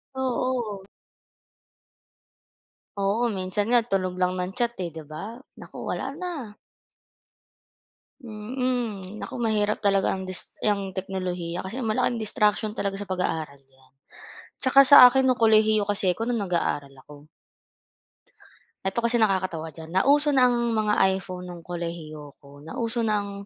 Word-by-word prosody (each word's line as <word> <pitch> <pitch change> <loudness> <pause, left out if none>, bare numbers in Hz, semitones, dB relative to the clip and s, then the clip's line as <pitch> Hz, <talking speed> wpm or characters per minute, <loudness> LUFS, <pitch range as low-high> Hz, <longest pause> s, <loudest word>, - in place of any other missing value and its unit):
Oo. 250 -5 -2 2.1
Oo, 200 +4 +1
minsan 185 +2 -1
nga, 240 - +6
tunog 185 -2 0
lang 180 0 +1
ng 180 +1 -3
chat, 240 -1 0
'di 170 -3 -5
ba, 220 - -8 0.2
naku - - -12
wala 270 +1 -3
na. 310 -10 -6 1.7
Mm. 220 -3 -3
Naku - - -7
mahirap 210 -2 0
talaga 195 -2 +2
ang 190 -1 -5
dis 185 - -9
yang 200 -2 0
teknolohiya 185 -2 -4
kasi 230 +8 -5
malaking 235 +1 0
distraction 210 0 +1
talaga 195 -1 -2
sa 205 - -7
pag-aaral 160 -6 -2
yan, 135 -1 -28 0.7
'tsaka 270 +1 +6
sa 285 - +9
akin 265 +1 +2
no'ng 255 -1 +2
kolehiyo 215 -1 +4
kasi 195 -3 +1
ako 225 +4 -4
no'ng 235 -4 0
nag-aaral 145 -6 -2
ako. 145 0 -14 1.6
Ito 195 +4 0
kasi 235 +1 +1
nakakatawa 185 -7 0
diyan, 160 0 -11
nauso 290 +7 +4
na 260 - +5
ang 240 -2 +2
mga 215 -1 +1 0.2
iPhone 180 -1 -7
ng 175 -1 -9
kolehiyo 165 -4 -7
ako, 140 0 -17
nauso 230 +7 -3
na 215 -3 +1
ang 200 - -7
205 Hz, 135 wpm, -25 LUFS, 180-235 Hz, 2.1 s, sa